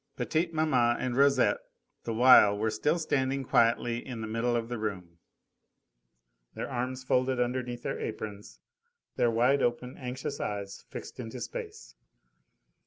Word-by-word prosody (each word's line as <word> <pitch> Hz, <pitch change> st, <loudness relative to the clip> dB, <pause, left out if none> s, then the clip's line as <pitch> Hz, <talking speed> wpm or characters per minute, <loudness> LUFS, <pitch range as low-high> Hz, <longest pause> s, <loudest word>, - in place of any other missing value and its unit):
Petite 165 Hz, +2 st, 0 dB
maman 130 Hz, -7 st, +2 dB
and 125 Hz, -1 st, -2 dB
Rosette 140 Hz, +1 st, +4 dB, 0.5 s
the 115 Hz, -, -2 dB
while 115 Hz, -4 st, +7 dB
were 110 Hz, +1 st, 0 dB
still 150 Hz, +9 st, +1 dB
standing 135 Hz, -4 st, 0 dB
quietly 115 Hz, -1 st, +2 dB
in 120 Hz, -4 st, -6 dB
the -, -, -3 dB
middle 115 Hz, +2 st, 0 dB
of 115 Hz, -1 st, -1 dB
the 120 Hz, -1 st, -4 dB
room, 90 Hz, -6 st, -5 dB, 1.4 s
their -, -, -4 dB
arms 125 Hz, +1 st, -3 dB
folded 130 Hz, 0 st, +1 dB
underneath 125 Hz, 0 st, -2 dB
their -, -, -3 dB
aprons, 105 Hz, -2 st, -6 dB, 0.6 s
their 120 Hz, -2 st, +2 dB
wide 125 Hz, +5 st, +3 dB
open, 125 Hz, +2 st, -1 dB
anxious 130 Hz, +2 st, -5 dB
eyes 100 Hz, -1 st, -5 dB
fixed -, -, -9 dB
into 115 Hz, -3 st, -6 dB
space. 445 Hz, -3 st, -7 dB
125 Hz, 140 wpm, -29 LUFS, 115-130 Hz, 1.4 s, while